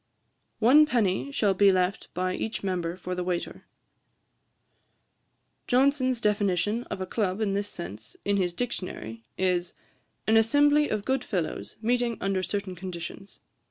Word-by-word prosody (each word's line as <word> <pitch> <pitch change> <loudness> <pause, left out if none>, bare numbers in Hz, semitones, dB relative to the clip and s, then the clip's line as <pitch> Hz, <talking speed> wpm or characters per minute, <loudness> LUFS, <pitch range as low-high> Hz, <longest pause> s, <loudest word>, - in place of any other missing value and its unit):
'One 275 +7 +6
penny 230 -1 +1
shall 210 -7 +2
be 195 +1 +5
left 185 +1 0
by 185 +1 0
each 220 +2 -4
member 180 -2 -2
for 180 0 -5
the 180 0 -2
waiter.' 175 -1 -4 2.0
Johnson's 260 -1 +3
definition 210 +1 +1
of 190 - -5
a - - -1
Club 190 0 -1
in 210 -3 0
this 200 +1 -1
sense, 105 +5 -8
in 200 0 +2
his 180 -3 0
Dictionary, 175 - -5
is, 180 -2 0 0.5
'An 220 +1 +4
assembly 290 +6 +4
of 210 -2 -2
good 265 -1 0
fellows, 180 -7 -3
meeting 240 -1 +1
under 195 -1 0
certain 195 0 -3
conditions.' 180 +1 -8
200 Hz, 140 wpm, -27 LUFS, 180-235 Hz, 2.0 s, One